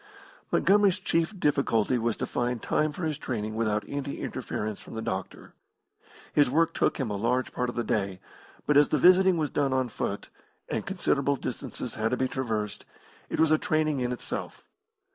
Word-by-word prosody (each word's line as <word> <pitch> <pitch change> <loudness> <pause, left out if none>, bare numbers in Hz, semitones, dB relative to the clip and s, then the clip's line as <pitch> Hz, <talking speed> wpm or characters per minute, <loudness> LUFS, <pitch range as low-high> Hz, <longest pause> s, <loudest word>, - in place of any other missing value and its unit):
Montgomery's 200 -1 +4
chief 175 +1 0
difficulty 130 -5 +2
was 115 -1 0
to - - -2
find 120 0 -1
time 155 +6 +1
for 175 - -7
his 155 -2 -2
training 110 -6 -3
without 110 -1 0
any 140 0 -4
interference 105 -1 -4
from - - -10
the 110 - -3
doctor. 95 -3 -5 0.8
His 145 -3 +4
work 165 +5 +2
took - - +1
him 125 -6 -1
a - - -1
large 125 +5 0
part 125 0 -1
of - - -6
the 120 - 0
day, 100 -4 -1 0.5
but 150 - +4
as 145 - +6
the 150 - +2
visiting 185 +3 +6
was 155 -2 -1
done 140 -2 +1
on 130 -2 +1
foot, 100 -2 -4 0.4
and - - -3
considerable - - +1
distances - - -5
had 110 +1 0
to 125 - 0
be 130 - +1
traversed, 110 -6 -3 0.5
it - - -3
was 160 -1 +4
a 155 - +5
training 155 -6 +1
in 125 -1 -1
itself. 125 - -5
130 Hz, 185 wpm, -28 LUFS, 110-155 Hz, 0.8 s, as